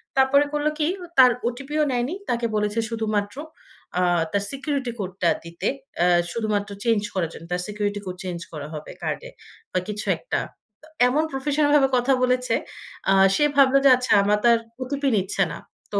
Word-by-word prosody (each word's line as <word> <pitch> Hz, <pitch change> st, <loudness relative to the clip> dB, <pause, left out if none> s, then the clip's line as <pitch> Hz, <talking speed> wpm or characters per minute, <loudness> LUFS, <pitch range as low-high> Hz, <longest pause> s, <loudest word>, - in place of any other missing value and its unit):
তারপরে 270 Hz, +2 st, +5 dB
করল 295 Hz, 0 st, 0 dB
কি? 305 Hz, -, +2 dB, 0.3 s
তার 255 Hz, -1 st, +8 dB, 0.2 s
ওটিপিও 275 Hz, +5 st, -2 dB
নেয়নি। 250 Hz, +7 st, -1 dB
তাকে 235 Hz, -1 st, 0 dB
বলেছে 210 Hz, +1 st, 0 dB
শুধুমাত্র 215 Hz, -2 st, -2 dB, 0.6 s
আ -, -, +2 dB, 0.3 s
তার 200 Hz, 0 st, 0 dB
সিকিউরিটি 275 Hz, -2 st, -2 dB
কোডটা 185 Hz, -2 st, -1 dB
দিতে। 170 Hz, 0 st, -5 dB, 0.3 s
এ্যা 175 Hz, -, +4 dB, 0.2 s
শুধুমাত্র 210 Hz, -3 st, -1 dB
চেঞ্জ 225 Hz, -3 st, +2 dB
করার 175 Hz, -4 st, -1 dB
জন্য। 165 Hz, -, -10 dB
তার 180 Hz, -, -1 dB
সিকিউরিটি 205 Hz, -1 st, -2 dB
কোড 185 Hz, -1 st, -5 dB
চেঞ্জ 180 Hz, -2 st, -4 dB
করা 150 Hz, -1 st, -6 dB
হবে 150 Hz, 0 st, -7 dB
কার্ডে -, -, -3 dB, 0.4 s
বা 185 Hz, -, +1 dB
কিছু 210 Hz, 0 st, -4 dB
একটা। -, -, -2 dB, 0.4 s
তো 315 Hz, -, -17 dB, 0.2 s
এমন 295 Hz, +5 st, +2 dB
প্রফেশনাল 290 Hz, +2 st, +1 dB
ভাবে 270 Hz, -2 st, +4 dB
কথা 250 Hz, +2 st, +2 dB
বলেছে 250 Hz, -1 st, +1 dB, 0.6 s
আ -, -, +6 dB, 0.2 s
সে -, -, +2 dB
ভাবলো 275 Hz, -1 st, +6 dB
যে, -, -, +9 dB
"আচ্ছা, 250 Hz, -2 st, 0 dB
আমার 210 Hz, +1 st, +3 dB
তার 235 Hz, -1 st, +6 dB, 0.2 s
ওটিপি 280 Hz, +2 st, -2 dB
নিচ্ছে 190 Hz, 0 st, 0 dB
না। -, -, -6 dB, 0.4 s
তো -, -, +2 dB
240 Hz, 175 wpm, -23 LUFS, 205-275 Hz, 0.6 s, যে